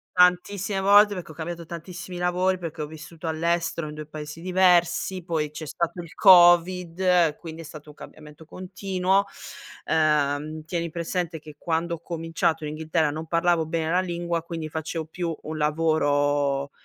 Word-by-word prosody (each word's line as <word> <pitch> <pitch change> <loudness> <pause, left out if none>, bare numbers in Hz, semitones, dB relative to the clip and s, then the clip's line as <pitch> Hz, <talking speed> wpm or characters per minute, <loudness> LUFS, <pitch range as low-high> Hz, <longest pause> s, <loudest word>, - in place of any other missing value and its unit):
Tantissime 180 +2 +2
volte, 205 +1 +6
perché 175 -3 -7
ho - - -11
cambiato 170 +1 -6
tantissimi 175 +2 -8
lavori, 180 +1 +1
perché 160 -3 -5
ho - - -3
vissuto 160 +2 -9
all'estero 165 0 -1
in 150 - -8
2 155 0 -7
paesi 155 +1 -8
diversi, 180 0 +2
poi 160 -3 -1
c'è 155 +1 -8
stato 170 +3 -3
il 165 - -13
covid, 175 -2 +5
quindi 165 -1 -9
è - - -9
stato 155 -1 -11
un 150 - -13
cambiamento 150 0 -13
continuo. 185 +2 -1 0.6
Ehm, 155 0 +1
tieni 170 -1 -3
presente 170 0 -3
che 150 -1 -13
quando 170 +1 -1
ho - - -13
cominciato 165 -1 -2
in 150 - -3
Inghilterra 160 0 0
non 155 +2 -5
parlavo 170 0 +1
bene 160 0 -2
la 180 +2 +2
lingua, 170 -2 -3
quindi 165 -2 -5
facevo 160 +1 -4
più 165 0 -4
un 155 0 -6
lavoro, 145 -2 +1
165 Hz, 160 wpm, -25 LUFS, 155-180 Hz, 0.6 s, volte